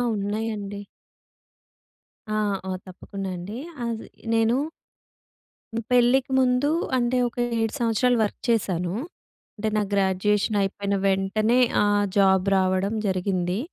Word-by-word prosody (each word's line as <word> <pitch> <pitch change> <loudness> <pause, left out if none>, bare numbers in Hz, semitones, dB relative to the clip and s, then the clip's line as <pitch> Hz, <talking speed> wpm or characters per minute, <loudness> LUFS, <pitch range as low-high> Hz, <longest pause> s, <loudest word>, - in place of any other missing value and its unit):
ఉన్నాయండి. 205 0 -3 1.5
ఆ! - - -2 0.4
ఆ! - - -1
తప్పకుండా 195 +1 -7
అండి. 195 +6 -6 0.3
అది 230 -1 -4 0.3
నేను 225 +1 +3 1.2
హ్మ్. 230 - -2
పెళ్ళికి 250 +2 +4
ముందు 255 +2 +3 0.3
అంటే, 245 +1 +1
ఒక 240 - -10 0.2
7 225 -1 -1
సంవత్సరాలు 240 +1 +2
వర్క్ 210 - -3
చేశాను. 180 -6 0 0.6
అంటే 215 +1 -1
నాకు 205 -2 0
గ్రాడ్యుయేషన్ 200 +2 +1
అయిపోయిన 200 +1 -1
వెంటనే 195 +4 +2 0.2
ఆహ్, 205 0 +3
జాబ్ 190 -1 +4
రావడం 190 +2 +1
జరిగింది. 185 0 0
205 Hz, 110 wpm, -25 LUFS, 195-225 Hz, 1.5 s, పెళ్ళికి